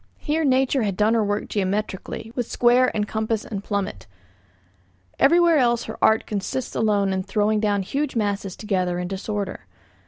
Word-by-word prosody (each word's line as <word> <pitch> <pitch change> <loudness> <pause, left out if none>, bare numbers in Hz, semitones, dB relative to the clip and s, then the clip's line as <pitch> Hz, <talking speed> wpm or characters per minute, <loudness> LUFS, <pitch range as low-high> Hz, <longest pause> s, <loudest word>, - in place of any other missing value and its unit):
Here 315 +1 -1
nature 265 -1 +2
had 200 -4 -1
done 215 +2 +3
her 225 -2 +2
work 205 0 -2
geometrically, 205 +2 -3
with 245 -2 -2
square 245 +1 +4
and 210 -1 0
compass 220 +1 -2
and 200 -3 -5
plummet. 200 - -3 1.1
Everywhere 335 +1 +5
else 240 -2 +2
her - - -8
art 220 0 +4
consists 215 +5 -3
alone 205 -3 +1
in 190 - -1
throwing 210 +2 +1
down 205 -2 +1
huge 275 +8 -2
masses 200 -3 -1
together 185 -4 -1
in 180 0 -3
disorder. 195 - -4
210 Hz, 160 wpm, -23 LUFS, 200-240 Hz, 1.1 s, Everywhere